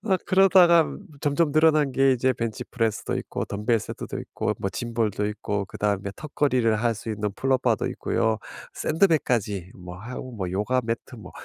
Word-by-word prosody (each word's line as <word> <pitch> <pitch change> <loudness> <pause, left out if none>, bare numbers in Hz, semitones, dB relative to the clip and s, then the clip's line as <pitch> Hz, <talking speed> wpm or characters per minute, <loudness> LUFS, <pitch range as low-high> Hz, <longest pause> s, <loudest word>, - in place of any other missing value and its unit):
어 195 -4 +3
그러다가 185 -3 +6 0.4
점점 145 +1 +1
늘어난 155 -3 +4
게 135 +1 +4
이제 130 +1 +2
벤치 115 +2 -4
프레스도 115 -3 -2
있고 - - -4
덤벨 105 +3 0
세트도 - - -6
있고 - - -3
뭐 95 - -1 0.4
짐볼도 105 +1 -2
있고 105 -1 -3
그다음에 100 -1 -2
턱걸이를 130 -7 +1
할 115 -1 +2
수 115 - -6
있는 105 -1 -2
풀업바도 130 -3 +1
있고요. 110 -1 0 0.4
샌드백까지 125 - +1
뭐 90 0 -9
하고 125 +4 -7
뭐 95 -6 -4
요가 105 +6 +1
매트 115 +2 -4
뭐 110 - -11
120 Hz, 350 characters per minute, -25 LUFS, 105-145 Hz, 0.4 s, 그러다가